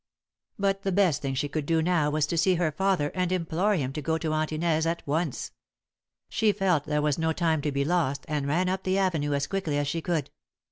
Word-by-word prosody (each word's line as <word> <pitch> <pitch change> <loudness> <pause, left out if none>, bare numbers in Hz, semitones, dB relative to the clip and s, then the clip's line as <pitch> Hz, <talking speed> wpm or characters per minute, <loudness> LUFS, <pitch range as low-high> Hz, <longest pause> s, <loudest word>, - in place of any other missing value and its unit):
But 195 0 0
the 195 - -1
best 180 -6 +2
thing 135 -1 -2
she 145 - 0
could 145 0 -3
do 165 -1 +2
now 160 -2 +2
was 150 0 +1
to 160 - -3
see 185 +2 +3
her 170 -2 +1
father 170 -2 0
and 180 -1 -1
implore 185 +3 +1
him 135 -6 -2
to 150 - -4
go 160 +2 0
to 160 -1 -2
Aunt 155 0 0
Inez 160 0 +1
at 170 +1 -2
once. 155 0 -2 0.8
She 215 -1 +2
felt 190 -7 +1
there 150 0 0
was 150 +1 +1
no 160 0 +1
time 160 -3 +1
to 150 - -1
be 140 0 0
lost, 145 -5 0
and 145 -2 -2
ran 175 +6 +1
up 190 +1 -1
the 190 0 0
avenue 160 -7 +1
as 140 - 0
quickly 190 -7 -2
as 145 0 0
she 165 +3 -2
could. 160 -5 -2
160 Hz, 235 wpm, -27 LUFS, 150-180 Hz, 0.8 s, see